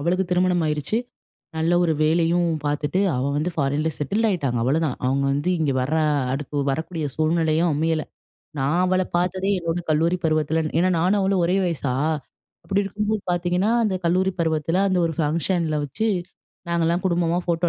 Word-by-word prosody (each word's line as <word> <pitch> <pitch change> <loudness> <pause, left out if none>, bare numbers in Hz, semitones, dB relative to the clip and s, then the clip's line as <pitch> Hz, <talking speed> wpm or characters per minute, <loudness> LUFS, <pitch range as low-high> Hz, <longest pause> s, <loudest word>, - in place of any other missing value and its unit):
அவளுக்கு 180 +5 +1
திருமணம் 180 -1 +2
ஆயிருச்சு. 150 +7 -1 0.6
நல்ல 160 +2 +1
ஒரு 165 -2 +2
வேலையும் 170 +2 +2 0.2
பார்த்துட்டு 150 +4 0 0.2
அவ 125 - -1
வந்து 155 +4 0
ஃபாரின்ல 145 +2 0
செட்டில் 205 - 0
ஆயிட்டாங்க, 140 - -1
அவ்வளதான். 140 +2 0
அவங்க 135 +2 +1
வந்து 145 +6 0
இங்கே 150 -4 +1
வர்ற 140 +5 0 0.4
அடுத்து 145 +1 -2
வரக்கூடிய 160 +3 -3
சூழ்நிலையும் 160 +1 +1
அமையல. 160 +1 0 0.6
நான் 140 +6 +1
அவளை 185 0 +2
பார்த்ததே 185 +2 0
என்னோட 170 0 -2
கல்லூரி 165 +3 +2
பருவத்தில 155 0 +1 0.2
ஏன்னா 185 - +3
நானும் 190 +4 +2
அவளும் 190 -2 +1
ஒரே 180 +3 +1
வயசா. 145 -7 -1 0.7
அப்டி 200 +1 +1
இருக்கும்போது 210 +1 -2
பார்த்தீங்கன்னா, 180 +3 +1
அந்த 210 -4 0
கல்லூரி 185 +3 +2
பருவத்தில 160 +1 0
அந்த 185 -1 +1
ஒரு 165 - -2
ஃபங்க்ஷன்ல 160 +1 0
வச்சு 210 +11 -2 0.6
நாங்கள்லாம் 170 +1 0
குடும்பமா 175 -1 +1
ஃபோட்டோ 170 0 0
165 Hz, 155 wpm, -23 LUFS, 155-180 Hz, 0.7 s, ஏன்னா